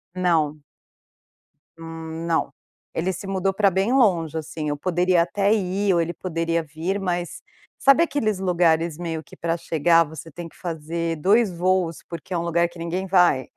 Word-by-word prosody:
Não. 160 -5 +1 1.2
Não, 165 0 -3 0.4
ele 185 +3 -1
se 185 - -8
mudou 195 0 0
para 200 0 +3
bem 195 +7 +1
longe, 175 - +2
assim 155 -1 -4
eu 145 - -2
poderia 180 +1 +2
até 200 +4 +1
ir 195 -1 +1
ou 170 - +3
ele 170 +1 -2
poderia 165 -2 -1
vir, 165 +6 -3
mas 175 -2 -3 0.4
sabe 275 +5 +5
aqueles 220 - -1
lugares 170 -3 +2
meio 165 -2 -4
que - - -15
para 165 0 -1
chegar, 165 +1 +3
você 160 +1 -10
tem 170 +2 -8
que - - -24
fazer 165 0 -3
2 200 +5 +3
voos, 175 -1 0
porque 170 +2 -7
é - - +1
um - - -1
lugar 170 0 +2
que 170 - -15
ninguém 180 +3 -3
vai. 180 -8 +3
170 Hz, 170 wpm, -23 LUFS, 165-185 Hz, 1.2 s, sabe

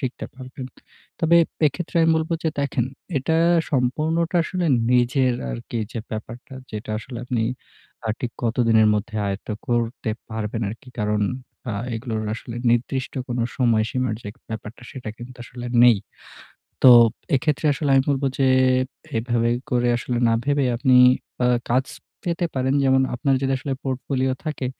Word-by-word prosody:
শিখতে 130 -3 -4
পারবেন? 130 0 -8 0.5
তবে 170 +1 +5 0.3
এক্ষেত্রে 170 +3 -3
আমি 165 - +4
বলবো 160 +1 -1
যে, 160 - +1
দেখেন, 130 -4 0 0.3
এটা 160 +5 0 0.3
সম্পূর্ণটা 155 +6 +1
আসলে 180 -1 -2 0.3
নিজের 125 +1 +3 0.2
আরকি - - -5
যে, 115 - -4
ব্যাপারটা, 115 +5 -7 0.2
যেটা 110 0 -6
আসলে 120 +1 -8
আপনি 125 -3 -1 0.6
আ - - -2
ঠিক 120 -1 -3
কতদিনের 115 -2 +3
মধ্যে 110 +2 -3
আয়ত্ত 100 +3 -5 0.2
করতে 120 -1 -1 0.2
পারবেন 110 +1 -3
আরকি। 115 +3 -11
কারণ 105 0 +1 0.5
আ - - -2 0.2
এগুলোর 110 -1 -3
আসলে 115 +1 -8
নির্দিষ্ট 125 +2 0 0.2
কোন 120 0 -2 0.2
সময়সীমার 120 0 +1
যে, - - -11
এক 115 - -17
ব্যাপারটা, 110 +2 -7
সেটা 125 -5 -7
কিন্তু 125 +1 -10
আসলে 120 +1 -8 0.2
নেই। 120 -3 +7 0.9
তো 130 - +11 0.4
এক্ষেত্রে 150 +3 +1
আসলে 150 -3 -1
আমি 135 - +5
বলবো 140 0 0
যে, 135 -1 +4 0.7
এভাবে 115 0 +1 0.2
করে 120 -1 +2
আসলে 120 0 -2
না 115 - +3
ভেবে 145 -1 +2
আপনি 130 +1 +3 0.5
আ - - +4 0.2
কাজ 130 +2 +3 0.4
পেতে 170 0 0
পারেন। 130 +1 +1
যেমন 130 0 +4
আপনার 135 +2 +1
যদি 135 - +1
আসলে 135 +1 -4
পোর্টফোলিও 130 0 -1
থাকে, 150 -4 -3
125 Hz, 150 wpm, -23 LUFS, 115-135 Hz, 0.9 s, তো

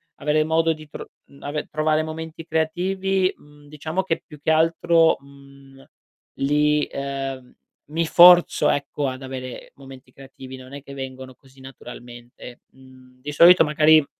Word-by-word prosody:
avere 150 +1 0
modo 160 +1 +1
di 155 0 -13
tro - - -10 0.2
mhmm, 140 - -20
ave 145 +1 -4
trovare 155 0 0
momenti 160 +1 -8
creativi, 185 +4 -1
mhmm, 145 0 -20
diciamo 155 +5 -4
che 165 -3 -2
più 150 - -13
che 160 - 0
altro, 165 +1 +3
mhmm, 140 -1 -18 0.6
li 150 +1 +1
ehm, 135 -2 -6 0.4
mi 165 +2 -1
forzo 175 +2 +6
ecco, 145 0 -2
ad 130 0 -6
avere 130 -1 -8
momenti 135 -2 -14
creativi, 135 0 -12
non 130 +1 -13
è 140 -1 -9
che 140 - -11
vengono 130 -1 -8
così 135 +1 -22
naturalmente. 120 -2 -12
Mhmm, 130 -1 -20
di 145 +2 -6
solito 170 +4 +7
magari 155 0 +4
145 Hz, 150 wpm, -22 LUFS, 135-160 Hz, 0.6 s, solito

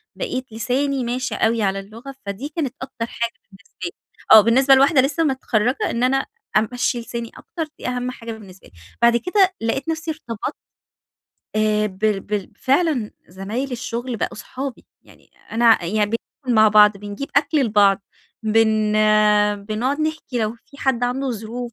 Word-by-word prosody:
بقيت 255 - -4
لساني 260 +4 -1
ماشي 250 +2 -2
أوي 225 +1 +1
على 195 0 0
اللغة، 230 +8 -10
فدي 200 +9 -5
كانت 290 -5 -3
أكتر 250 -3 -5
حاجة 235 0 -3 0.2
بالنسبة 195 +1 -20
لي 350 - -3 0.4
آه 220 - +11
بالنسبة 260 +5 +5
لواحدة 275 +1 +5
لسّه 280 +5 0
متخرَّجة 255 -4 0
إن 235 - -1
أنا 270 +1 +2 0.3
أمشِّي 245 +3 0
لساني 235 0 -6
أكتر، 335 - -5 0.2
دي - - -5
أهم 250 0 -2
حاجة 230 -2 -8
بالنسبة 195 -4 -12
لي. - - -23 0.3
بعد 235 0 +5
كده 375 - +2
لقيت 250 +7 -1
نفسي 320 0 -2
ارتبطت 240 -4 -5 1.0
آآ، 215 0 +2
بال 205 +1 -1
بال 205 -1 -4
فعلًا 275 -5 +1 0.2
زمايل 210 +9 -4
الشغل 240 0 -4
بقوا - - -2
اصحابي، 265 +3 -7 0.2
يعني - - -21 0.2
أنا 225 -4 +4
يعني 210 +4 +1
بناكل 235 +3 -4
مع 215 0 +7
بعض، 210 -1 +6
بنجيب 205 +7 -6
أكل 290 +1 +3
لبعض، 200 -3 +3 0.4
بن 220 -1 +2 0.7
بنقعد 240 +8 -1
نحكي 310 -5 -2
لو 215 +1 -1
في 280 - -17
حد 255 -3 +1
عنده 260 +2 -1
ظروف. 235 +2 -5
235 Hz, 155 wpm, -21 LUFS, 215-270 Hz, 1.0 s, آه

